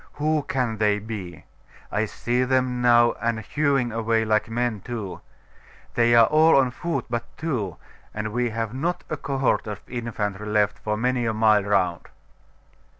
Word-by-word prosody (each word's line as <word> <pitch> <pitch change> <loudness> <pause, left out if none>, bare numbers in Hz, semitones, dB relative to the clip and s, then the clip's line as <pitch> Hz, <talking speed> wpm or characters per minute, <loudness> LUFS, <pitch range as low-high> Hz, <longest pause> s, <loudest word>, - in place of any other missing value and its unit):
Who 155 +1 0
can 125 -5 -2
they 105 -1 +2
be? 100 -7 -7 0.5
I 105 +1 +1
see 120 +3 -1
them 130 -1 +1
now, 120 -1 +5
and 115 -1 0
hewing 135 0 0
away 115 0 0
like 110 0 +1
men 115 -2 -1
too. 110 -6 -6 0.7
They 120 0 +4
are 115 -1 +8
all 155 +3 +5
on 130 -2 +3
foot 170 +6 -3
but 120 0 -3
two; 110 - -3 0.3
and 105 0 -4
we 120 0 0
have 115 0 -3
not 165 +7 -2
a - - 0
cohort 135 -4 0
of 105 -1 -5
infantry 105 -4 -4
left 105 -1 +1
for 105 0 -2
many 125 +1 0
a 110 - -1
mile 110 -2 +4
round. 95 -4 0
115 Hz, 160 wpm, -24 LUFS, 105-125 Hz, 0.7 s, are